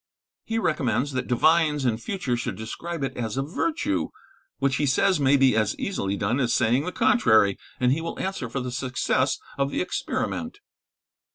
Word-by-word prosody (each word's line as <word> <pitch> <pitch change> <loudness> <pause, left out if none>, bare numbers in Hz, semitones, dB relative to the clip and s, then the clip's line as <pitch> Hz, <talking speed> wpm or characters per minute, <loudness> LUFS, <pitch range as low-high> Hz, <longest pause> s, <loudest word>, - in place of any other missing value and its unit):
He 225 - -2
recommends 140 - 0
that 130 -1 -3
divines 150 +2 +3
in 115 -3 +1
future 145 - -2
should 120 - -3
describe 150 +9 -5
it 135 - -3
as 115 -1 -3
a 135 - +1
virtue, 145 - -1 0.5
which, 135 0 +1
he 145 - +1
says, 185 +6 +3
may 140 0 +4
be 130 -3 +4
as 110 -2 +1
easily 100 - -2
done 110 +8 0
as 120 -3 +1
saying 125 +6 +2
the 180 - -2
contrary, 115 - +4 0.2
and 125 0 +3
he 150 +5 +1
will 165 - -5
answer 190 -11 -3
for 135 +3 -3
the 125 0 -4
success 130 +1 0 0.2
of 140 0 +1
the - - -2
experiment. 255 - -3
135 Hz, 180 wpm, -25 LUFS, 120-170 Hz, 0.5 s, may